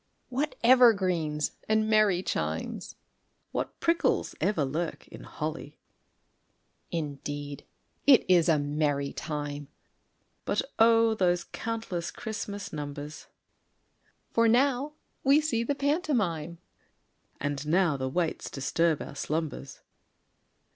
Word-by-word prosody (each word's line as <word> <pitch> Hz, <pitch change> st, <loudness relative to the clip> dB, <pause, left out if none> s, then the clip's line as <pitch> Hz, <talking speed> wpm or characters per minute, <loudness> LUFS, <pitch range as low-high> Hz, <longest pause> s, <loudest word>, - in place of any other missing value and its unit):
_) -, -, -46 dB, 0.3 s
What 275 Hz, +4 st, -2 dB
evergreens 185 Hz, -, +4 dB, 0.2 s
and 215 Hz, 0 st, +3 dB
merry 215 Hz, -4 st, +3 dB
chimes! -, -, -3 dB, 0.6 s
(What -, -, -4 dB
prickles 335 Hz, +1 st, +1 dB
ever 165 Hz, -9 st, +1 dB
lurk 160 Hz, +5 st, -3 dB
in -, -, -10 dB
holly!) 155 Hz, -1 st, -5 dB, 1.1 s
Indeed 145 Hz, -2 st, -5 dB, 0.4 s
it 270 Hz, -4 st, +7 dB
is 175 Hz, -2 st, +5 dB
a 160 Hz, -, +5 dB
merry 145 Hz, -1 st, -1 dB
time; 145 Hz, -2 st, -4 dB, 0.8 s
(But -, -, 0 dB, 0.2 s
O! 225 Hz, 0 st, +5 dB
those 180 Hz, -4 st, +1 dB
countless 220 Hz, -5 st, -4 dB
Christmas 205 Hz, -4 st, -6 dB
numbers!) 145 Hz, 0 st, -6 dB, 1.0 s
For 230 Hz, 0 st, +3 dB
now 265 Hz, +4 st, +2 dB, 0.3 s
we 275 Hz, +2 st, +6 dB
see 300 Hz, -7 st, 0 dB
the 280 Hz, +4 st, -1 dB
pantomime, 240 Hz, -, 0 dB, 0.8 s
(_And 145 Hz, -1 st, -2 dB
now 170 Hz, -1 st, +3 dB
the 130 Hz, -1 st, -2 dB
waits 165 Hz, +3 st, -1 dB
disturb 155 Hz, +3 st, 0 dB
our -, -, -9 dB
slumbers. 145 Hz, -2 st, -4 dB
175 Hz, 105 wpm, -28 LUFS, 150-230 Hz, 1.1 s, it